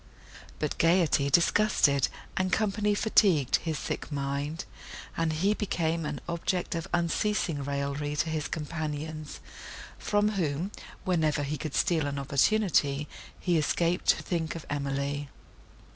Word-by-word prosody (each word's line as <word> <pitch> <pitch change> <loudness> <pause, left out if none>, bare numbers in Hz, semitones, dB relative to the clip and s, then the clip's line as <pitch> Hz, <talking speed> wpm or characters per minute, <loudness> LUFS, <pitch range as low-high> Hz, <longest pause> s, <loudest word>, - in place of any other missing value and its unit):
But 150 - -2
gaiety 165 -4 +3
disgusted, 145 -5 +4 0.3
and 185 -1 0
company 210 0 +1
fatigued, 190 - +4
his 160 -3 -3
sick - - -4
mind; 140 +3 -2 0.5
and 165 -1 +1
he 185 +7 +2
became 165 -6 -1
an 150 -2 -4
object 170 +1 -1
of 165 +1 -3
unceasing 170 -2 0
raillery 140 +1 -2
to 160 +2 0
his 155 -2 -2
companions, 155 -1 -5 0.6
from 205 0 +2
whom, 175 -2 -1 0.3
whenever 155 -5 +1
he 145 +2 -2
could 150 0 -5
steal 160 -4 +2
an 140 0 -3
opportunity, 145 0 +2 0.3
he 175 -3 +2
escaped, 170 +3 0
to - - +4
think 165 -3 -2
of 165 - -7
Emily. 140 0 -2
160 Hz, 130 wpm, -29 LUFS, 145-175 Hz, 0.6 s, disgusted